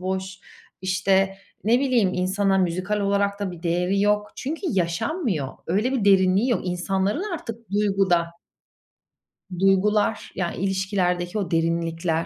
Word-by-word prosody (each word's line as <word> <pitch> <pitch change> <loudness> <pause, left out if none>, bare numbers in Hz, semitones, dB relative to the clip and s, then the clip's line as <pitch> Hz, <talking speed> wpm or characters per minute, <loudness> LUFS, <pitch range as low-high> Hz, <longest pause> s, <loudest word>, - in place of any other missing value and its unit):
boş; 190 +1 -4 0.4
işte, 190 +1 +1 0.3
ne 240 +4 +4
bileyim, 245 -8 +2
insana 195 +1 +1
müzikal 185 +4 0
olarak 200 0 0
da 200 - -2
bir 175 -1 -10
değeri 180 +3 +1
yok. 210 0 +2
Çünkü 305 +5 -4
yaşanmıyor. 180 - -1 0.2
Öyle 210 +10 +1
bir 245 -6 0
derinliği 195 +4 +4
yok. 230 - +1
İnsanların 190 - -1
artık 230 - -8
duyguda 195 -4 +2 1.3
Duygular 205 +3 +2
ya, 175 -2 -1
ilişkilerdeki 190 -1 -1
o 195 - -3
derinlikler 165 0 0
195 Hz, 120 wpm, -24 LUFS, 180-205 Hz, 1.3 s, ne